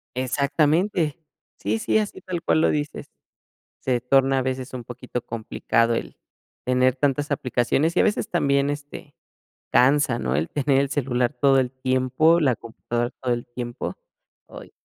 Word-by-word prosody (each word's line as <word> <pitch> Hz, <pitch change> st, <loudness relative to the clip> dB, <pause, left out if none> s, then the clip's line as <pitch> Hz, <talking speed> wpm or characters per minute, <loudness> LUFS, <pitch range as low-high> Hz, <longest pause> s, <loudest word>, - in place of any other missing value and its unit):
Exactamente. 150 Hz, +6 st, +1 dB, 0.4 s
Sí, 110 Hz, +3 st, -1 dB
sí, -, -, +1 dB
así 210 Hz, -1 st, -2 dB
tal 180 Hz, -2 st, -4 dB
cual 160 Hz, -, +2 dB
lo -, -, +4 dB
dices. 150 Hz, 0 st, -3 dB, 0.7 s
Se 125 Hz, -2 st, 0 dB
torna 135 Hz, +1 st, +3 dB
a -, -, 0 dB
veces 130 Hz, 0 st, -3 dB
un 125 Hz, -2 st, -5 dB
poquito 125 Hz, 0 st, -6 dB
complicado 115 Hz, 0 st, 0 dB
el -, -, -5 dB, 0.5 s
tener 125 Hz, 0 st, +3 dB
tantas 145 Hz, +2 st, 0 dB
aplicaciones 135 Hz, +4 st, +1 dB
y -, -, +5 dB
a -, -, +5 dB
veces 210 Hz, 0 st, 0 dB
también, 140 Hz, -4 st, +2 dB
este, 145 Hz, 0 st, -7 dB, 0.6 s
cansa, 135 Hz, -1 st, +4 dB
¿no? 65 Hz, +1 st, -1 dB
El 75 Hz, +3 st, -1 dB
tener 140 Hz, -1 st, +2 dB
el 140 Hz, -, -1 dB
celular 125 Hz, -2 st, 0 dB
todo 135 Hz, -2 st, +4 dB
el 125 Hz, -1 st, 0 dB
tiempo, 130 Hz, +5 st, +2 dB
la 135 Hz, -7 st, +2 dB
computadora 120 Hz, +1 st, -4 dB
todo 125 Hz, -2 st, +1 dB
el 120 Hz, 0 st, -4 dB
tiempo. 120 Hz, 0 st, -5 dB, 0.5 s
Ay. -, -, -12 dB
130 Hz, 160 wpm, -24 LUFS, 125-145 Hz, 0.7 s, y